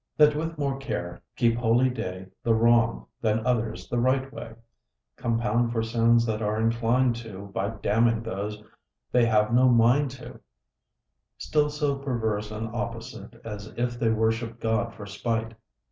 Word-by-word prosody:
That 150 Hz, -1 st, +6 dB
with 160 Hz, +1 st, -3 dB
more 140 Hz, -2 st, -1 dB
care 85 Hz, -10 st, -4 dB
keep 115 Hz, -1 st, +2 dB
holy 120 Hz, +2 st, +3 dB
day 95 Hz, -6 st, -5 dB, 0.2 s
The 115 Hz, -1 st, +2 dB
wrong, 115 Hz, 0 st, +3 dB, 0.2 s
than 110 Hz, 0 st, +1 dB
others 115 Hz, -3 st, -1 dB
the 120 Hz, -, -1 dB
right 130 Hz, +2 st, +1 dB
way: 115 Hz, -1 st, -8 dB, 0.6 s
Compound 120 Hz, -1 st, 0 dB
for 115 Hz, -1 st, 0 dB
sins 115 Hz, +1 st, +3 dB
they 110 Hz, -2 st, -1 dB
are 105 Hz, 0 st, 0 dB
inclin'd 115 Hz, +2 st, +2 dB
to, 100 Hz, -4 st, -9 dB
By 100 Hz, +1 st, -1 dB
damning 115 Hz, +1 st, +1 dB
those 105 Hz, 0 st, -5 dB, 0.5 s
they 120 Hz, -2 st, +4 dB
have 110 Hz, 0 st, +2 dB
no 130 Hz, +1 st, +5 dB
mind 125 Hz, +4 st, +4 dB
to: 130 Hz, 0 st, -10 dB, 1.0 s
Still 150 Hz, -1 st, +1 dB
so 145 Hz, -2 st, -1 dB
perverse 110 Hz, -6 st, -2 dB
and 110 Hz, +1 st, -5 dB
opposite, 115 Hz, -, -6 dB
As 105 Hz, -2 st, -7 dB
if 120 Hz, 0 st, -1 dB
they 115 Hz, -, +2 dB
worship'd 115 Hz, +1 st, 0 dB
God 115 Hz, +1 st, 0 dB
for 105 Hz, -, -8 dB
spite. 115 Hz, +2 st, -2 dB
115 Hz, 155 wpm, -26 LUFS, 110-125 Hz, 1.0 s, That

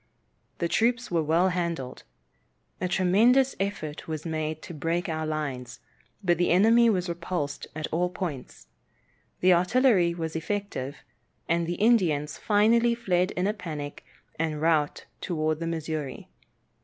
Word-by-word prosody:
The 170 Hz, -, 0 dB
troops 240 Hz, +5 st, +1 dB
were 170 Hz, -2 st, +2 dB
well 165 Hz, +4 st, +3 dB
handled. 170 Hz, -8 st, -3 dB, 0.8 s
A -, -, +1 dB
tremendous 220 Hz, +9 st, +3 dB
effort 195 Hz, -7 st, -4 dB
was 155 Hz, 0 st, -5 dB
made 155 Hz, -1 st, -3 dB
to -, -, -8 dB
break 165 Hz, +4 st, -1 dB
our 160 Hz, -1 st, -2 dB
lines, 135 Hz, -5 st, -4 dB, 0.4 s
but 175 Hz, -2 st, +2 dB
the 175 Hz, -, +2 dB
enemy 225 Hz, +6 st, +5 dB
was 185 Hz, -4 st, 0 dB
repulsed 170 Hz, -3 st, -3 dB
at 155 Hz, -1 st, -3 dB
all 175 Hz, +2 st, +1 dB
points. 170 Hz, -8 st, -6 dB, 0.8 s
The 185 Hz, 0 st, +6 dB
artillery 180 Hz, -1 st, +3 dB
was 160 Hz, -1 st, -4 dB
effective, 165 Hz, -5 st, -4 dB, 0.4 s
and 170 Hz, 0 st, +1 dB
the 175 Hz, -, -2 dB
Indians 175 Hz, -10 st, +2 dB
finally 230 Hz, +3 st, +3 dB
fled 185 Hz, -6 st, +1 dB
in 180 Hz, -, -1 dB
a 205 Hz, -, +1 dB
panic 155 Hz, -8 st, -6 dB, 0.4 s
and 155 Hz, -2 st, -1 dB
rout 155 Hz, -2 st, +1 dB
towards 155 Hz, -3 st, -1 dB
the 165 Hz, -, -3 dB
Missouri. 155 Hz, -4 st, -4 dB
170 Hz, 140 wpm, -27 LUFS, 155-190 Hz, 0.8 s, The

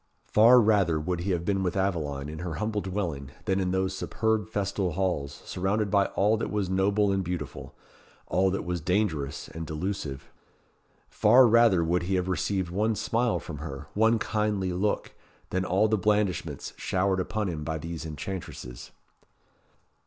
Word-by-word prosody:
Far 115 Hz, +4 st, +6 dB
rather 100 Hz, -8 st, +3 dB
would 85 Hz, +3 st, -2 dB
he 90 Hz, +4 st, -3 dB
have 85 Hz, -2 st, 0 dB
been 95 Hz, 0 st, +1 dB
with 95 Hz, +1 st, -1 dB
Aveline, 75 Hz, -8 st, -1 dB
in 80 Hz, +1 st, -7 dB
her 85 Hz, -2 st, -4 dB
humble 105 Hz, +4 st, -2 dB
dwelling, 90 Hz, -9 st, -3 dB, 0.2 s
than 95 Hz, 0 st, +1 dB
in 95 Hz, -1 st, 0 dB
those 95 Hz, +1 st, 0 dB
superb 110 Hz, +2 st, -1 dB
festal 100 Hz, -4 st, -1 dB
halls, 80 Hz, -7 st, -2 dB
surrounded 100 Hz, +2 st, -1 dB
by 100 Hz, -1 st, +4 dB
all 105 Hz, +3 st, +3 dB
that -, -, -3 dB
was 100 Hz, -3 st, -1 dB
noble 100 Hz, +2 st, +2 dB
and 95 Hz, -1 st, 0 dB
beautiful 85 Hz, -5 st, -5 dB, 0.5 s
all 95 Hz, +1 st, +2 dB
that 95 Hz, -, -2 dB
was 90 Hz, -1 st, -2 dB
dangerous 85 Hz, -6 st, -1 dB
and 80 Hz, 0 st, -7 dB
delusive. 80 Hz, -4 st, -4 dB, 0.8 s
Far 130 Hz, +1 st, +6 dB
rather 115 Hz, -6 st, +5 dB
would 85 Hz, +1 st, +1 dB
he 95 Hz, +2 st, -1 dB
have 90 Hz, 0 st, 0 dB
received 95 Hz, -1 st, -1 dB
one 105 Hz, +4 st, +1 dB
smile 120 Hz, +1 st, 0 dB
from 75 Hz, -, -8 dB
her, 70 Hz, -3 st, -7 dB
one 110 Hz, +2 st, +4 dB
kindly 105 Hz, -4 st, -1 dB
look, 100 Hz, +4 st, -1 dB, 0.4 s
than 95 Hz, 0 st, 0 dB
all 95 Hz, +4 st, +2 dB
the 110 Hz, -1 st, +1 dB
blandishments 105 Hz, -1 st, 0 dB
showered 95 Hz, 0 st, 0 dB
upon 105 Hz, +3 st, -2 dB
him 80 Hz, -4 st, -4 dB
by 80 Hz, +1 st, -2 dB
these 80 Hz, +1 st, -6 dB
enchantresses. 75 Hz, -5 st, -7 dB
95 Hz, 165 wpm, -27 LUFS, 85-105 Hz, 0.8 s, Far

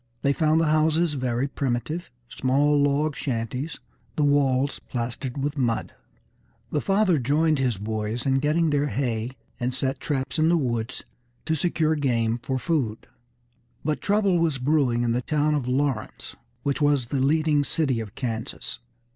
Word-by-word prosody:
They 140 Hz, -, +3 dB
found 155 Hz, +1 st, +3 dB
the 165 Hz, -, +3 dB
houses 155 Hz, +1 st, +2 dB
very 130 Hz, -1 st, -1 dB
primitive, 140 Hz, +6 st, -2 dB, 0.2 s
small 140 Hz, +4 st, +2 dB
log 145 Hz, +1 st, +2 dB
shanties, 125 Hz, +4 st, -3 dB, 0.4 s
the 150 Hz, -, +1 dB
walls 140 Hz, -1 st, +2 dB
plastered 125 Hz, +1 st, -4 dB
with 145 Hz, 0 st, -2 dB
mud. 120 Hz, -3 st, 0 dB, 0.8 s
The 150 Hz, -, 0 dB
father 195 Hz, -5 st, +3 dB
joined 150 Hz, +4 st, +2 dB
his 125 Hz, -5 st, +1 dB
boys 110 Hz, +3 st, -3 dB
in 135 Hz, -1 st, +3 dB
getting 150 Hz, +4 st, +2 dB
in 165 Hz, -, +3 dB
their 145 Hz, 0 st, +2 dB
hay, 125 Hz, -2 st, -2 dB, 0.2 s
and 125 Hz, 0 st, -1 dB
set 135 Hz, +1 st, -1 dB
traps 135 Hz, 0 st, -2 dB
in 160 Hz, +1 st, +4 dB
the 170 Hz, -, +4 dB
woods 120 Hz, -4 st, -2 dB, 0.4 s
to 160 Hz, -, 0 dB
secure 160 Hz, 0 st, +1 dB
game 120 Hz, -6 st, +1 dB
for 130 Hz, +2 st, -2 dB
food. 130 Hz, -6 st, -1 dB, 0.8 s
But 155 Hz, 0 st, 0 dB
trouble 200 Hz, -3 st, +2 dB
was 160 Hz, -4 st, +1 dB
brewing 130 Hz, -3 st, +2 dB
in 120 Hz, -, +1 dB
the 120 Hz, +2 st, +1 dB
town 150 Hz, +3 st, +1 dB
of 140 Hz, -4 st, -1 dB
Lawrence, 130 Hz, -3 st, -2 dB, 0.3 s
which 140 Hz, +1 st, -1 dB
was 145 Hz, -4 st, +3 dB
the 140 Hz, -2 st, 0 dB
leading 150 Hz, +1 st, +3 dB
city 140 Hz, -5 st, 0 dB
of 105 Hz, -3 st, -7 dB
Kansas. 115 Hz, -, -4 dB
140 Hz, 160 wpm, -25 LUFS, 125-155 Hz, 0.8 s, in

